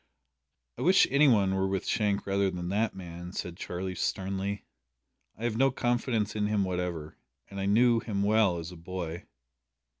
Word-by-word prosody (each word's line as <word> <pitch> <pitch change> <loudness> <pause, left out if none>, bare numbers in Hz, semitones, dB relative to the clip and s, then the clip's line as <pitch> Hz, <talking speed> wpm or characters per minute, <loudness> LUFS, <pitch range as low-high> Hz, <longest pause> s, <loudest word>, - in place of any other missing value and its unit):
"I - - -3
wish 185 +3 +6
any 140 +2 +5
one 100 -6 +4
were 95 0 +1
with 95 -1 -2
Shank 105 -2 0
rather 100 0 +1
than 90 -1 -4
that 105 +3 0
man," 85 -1 -8
said 85 -3 -4
Charlie 90 +1 -4
sternly; 95 +2 -2 0.7
"I 110 - -9
have 115 -2 0
no 135 +2 +4
confidence 120 -4 0
in 105 -1 +1
him 105 -1 +1
whatever, 90 -4 -3 0.3
and 100 - -6
I 95 - -1
knew 115 +3 +4
him 100 -3 -2
well 105 -3 +3
as 85 +1 -6
a 90 - -10
boy." 85 -1 -6
100 Hz, 175 wpm, -29 LUFS, 90-110 Hz, 0.7 s, wish